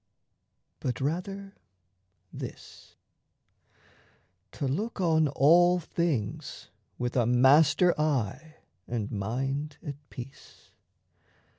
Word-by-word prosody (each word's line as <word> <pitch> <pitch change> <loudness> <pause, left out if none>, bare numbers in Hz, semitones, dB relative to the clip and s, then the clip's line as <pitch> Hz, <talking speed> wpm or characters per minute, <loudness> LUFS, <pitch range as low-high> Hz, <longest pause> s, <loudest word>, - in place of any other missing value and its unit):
But 125 - -3
rather 195 +7 -3 0.8
this: - - -10 1.6
To 140 - -3
look 205 - -2
on 160 -4 +3
all 175 +6 +5
things 160 -10 -3 0.3
with 120 0 -3
a 120 -3 +2
master 145 +8 +5
eye 150 +1 -1 0.3
And 115 -4 -3
mind 135 +8 -3
at 145 -2 -5
peace. 125 +2 -12
145 Hz, 85 wpm, -28 LUFS, 125-170 Hz, 1.6 s, all